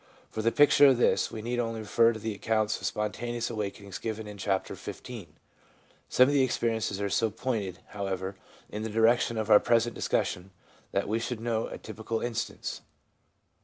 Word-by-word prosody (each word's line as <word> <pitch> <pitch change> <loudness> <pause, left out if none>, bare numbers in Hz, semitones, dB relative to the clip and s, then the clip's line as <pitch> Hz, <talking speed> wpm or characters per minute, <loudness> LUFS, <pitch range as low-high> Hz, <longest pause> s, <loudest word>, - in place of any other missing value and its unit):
For 110 - -3
the 115 +1 +2
picture 145 0 +7
of 130 -3 +5
this, 120 - +3
we 110 - -7
need 120 +1 -1
only 115 -2 -2
refer 115 +2 +4
to 110 - -5
the 110 0 -3
accounts 110 +1 0
of - - -1
spontaneous 120 +3 -2
awakenings 100 -3 -5
given 110 -1 -4
in 105 -1 -9
Chapter 95 -1 -1
XV. 115 -8 -8 0.8
Some 130 - +6
of 145 - +1
the 140 - +4
experiences 115 -5 0
are 100 - 0
so 110 +3 +1
pointed, 105 -4 -3
however, 95 -1 -3 0.3
in 105 - -5
the 110 - -3
direction 115 +1 +3
of 110 0 -1
our 105 - +9
present 120 0 +2
discussion, 90 +2 -1 0.4
that 100 - 0
we 110 +3 0
should 115 0 -3
note 115 -1 -1
a - - -5
typical 110 +1 -4
instance. 120 -1 -4
110 Hz, 180 wpm, -29 LUFS, 105-115 Hz, 0.8 s, our